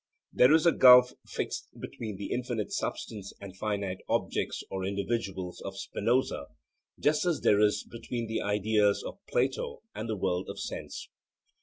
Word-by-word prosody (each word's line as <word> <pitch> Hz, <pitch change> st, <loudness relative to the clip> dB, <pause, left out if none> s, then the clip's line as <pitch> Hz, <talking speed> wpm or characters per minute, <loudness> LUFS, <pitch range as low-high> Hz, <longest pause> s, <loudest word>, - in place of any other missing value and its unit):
There 125 Hz, +3 st, +6 dB
is 160 Hz, +1 st, +5 dB
a 170 Hz, -, +7 dB
gulf 125 Hz, -3 st, +8 dB
fixed -, -, -5 dB
between 110 Hz, -4 st, -6 dB
the 100 Hz, -, -6 dB
infinite 120 Hz, -4 st, -2 dB
substance 100 Hz, -3 st, -4 dB
and 100 Hz, -2 st, -9 dB
finite 100 Hz, -2 st, -2 dB
objects -, -, -1 dB
or 95 Hz, -1 st, -3 dB
individuals 95 Hz, -2 st, -3 dB
of 95 Hz, 0 st, -6 dB
Spinoza, 115 Hz, -, 0 dB, 0.5 s
just 150 Hz, +1 st, +2 dB
as 175 Hz, -3 st, 0 dB
there 105 Hz, -, +4 dB
is 105 Hz, -1 st, +3 dB
between 120 Hz, 0 st, -5 dB
the 110 Hz, 0 st, -2 dB
ideas 105 Hz, 0 st, +2 dB
of -, -, -7 dB
Plato 485 Hz, -, -1 dB
and 110 Hz, +2 st, -5 dB
the 110 Hz, -, -1 dB
world 90 Hz, -1 st, -1 dB
of 100 Hz, -, -6 dB
sense. -, -, -6 dB
105 Hz, 155 wpm, -29 LUFS, 100-125 Hz, 0.5 s, gulf